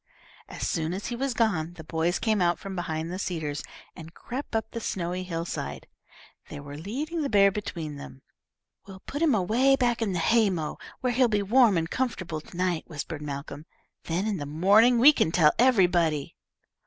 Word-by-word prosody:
As -, -, -4 dB
soon 165 Hz, 0 st, -1 dB
as 200 Hz, -, -6 dB
he 240 Hz, -, -3 dB
was 265 Hz, 0 st, -2 dB
gone, 175 Hz, -9 st, 0 dB
the 160 Hz, -, -10 dB
boys 165 Hz, +2 st, -1 dB
came 215 Hz, -3 st, 0 dB
out 175 Hz, 0 st, +2 dB
from 195 Hz, -2 st, -7 dB
behind 160 Hz, -2 st, -3 dB
the 185 Hz, -, -5 dB
cedars, 155 Hz, -6 st, -3 dB, 0.3 s
and 165 Hz, 0 st, -11 dB
crept 255 Hz, -1 st, -6 dB
up 220 Hz, -, -2 dB
the 230 Hz, -, -4 dB
snowy 180 Hz, -2 st, -3 dB
hillside. 170 Hz, -2 st, -5 dB, 0.6 s
They -, -, -7 dB
were 145 Hz, 0 st, -9 dB
leading 275 Hz, -, -4 dB
the 285 Hz, -, -1 dB
bear 200 Hz, -2 st, +5 dB
between 165 Hz, -7 st, -5 dB
them. 135 Hz, -1 st, -11 dB, 0.6 s
"We'll 190 Hz, -1 st, -11 dB
put 290 Hz, -, -6 dB
him 310 Hz, -7 st, +4 dB
away 235 Hz, +8 st, +3 dB
back 240 Hz, -3 st, 0 dB
in 210 Hz, -4 st, 0 dB
the -, -, -1 dB
hay 220 Hz, +5 st, +3 dB
mow 160 Hz, -5 st, -4 dB, 0.2 s
where 250 Hz, -1 st, 0 dB
he'll 250 Hz, +1 st, +4 dB
be 210 Hz, -3 st, 0 dB
warm 225 Hz, -1 st, +4 dB
and 165 Hz, 0 st, 0 dB
comfortable 185 Hz, -9 st, -3 dB
to 170 Hz, -, -13 dB
night," 180 Hz, -3 st, -1 dB
whispered 155 Hz, 0 st, -6 dB
Malcolm. 145 Hz, +1 st, -7 dB, 0.4 s
"Then 175 Hz, +4 st, -1 dB
in 210 Hz, -3 st, -1 dB
the 145 Hz, -3 st, -5 dB
morning 205 Hz, +11 st, +4 dB
we 275 Hz, +6 st, +8 dB
can 160 Hz, -, +1 dB
tell 155 Hz, -3 st, +5 dB
everybody." 175 Hz, -, +3 dB
185 Hz, 190 wpm, -27 LUFS, 160-230 Hz, 0.6 s, we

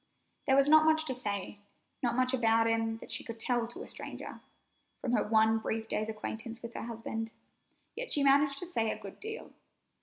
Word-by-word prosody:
There 265 Hz, -, +5 dB
was 275 Hz, 0 st, +6 dB
not 310 Hz, +1 st, +7 dB
much 315 Hz, 0 st, +4 dB
to 260 Hz, -, -1 dB
say, 205 Hz, -4 st, -4 dB, 0.4 s
not 240 Hz, -2 st, +1 dB
much 255 Hz, +1 st, +3 dB
about 225 Hz, -2 st, +4 dB
him 225 Hz, 0 st, +1 dB
that -, -, -10 dB
she -, -, -1 dB
could 230 Hz, -1 st, -7 dB
tell 240 Hz, 0 st, +1 dB
to 240 Hz, -, -7 dB
a -, -, -10 dB
stranger, -, -, -7 dB, 0.6 s
from 245 Hz, -, -2 dB
her 230 Hz, -4 st, +3 dB
one 220 Hz, +1 st, +4 dB
brief 220 Hz, 0 st, -2 dB
day's 215 Hz, 0 st, -1 dB
acquaintance 225 Hz, +2 st, -6 dB
with 235 Hz, 0 st, -6 dB
her -, -, -5 dB
husband, 225 Hz, -1 st, -4 dB, 0.6 s
yet -, -, -5 dB
she 285 Hz, -, +3 dB
managed 280 Hz, 0 st, +4 dB
to 355 Hz, -, -2 dB
say 230 Hz, -11 st, 0 dB
a -, -, -2 dB
good 195 Hz, -, -10 dB
deal. 440 Hz, +1 st, -7 dB
230 Hz, 205 wpm, -32 LUFS, 225-275 Hz, 0.6 s, not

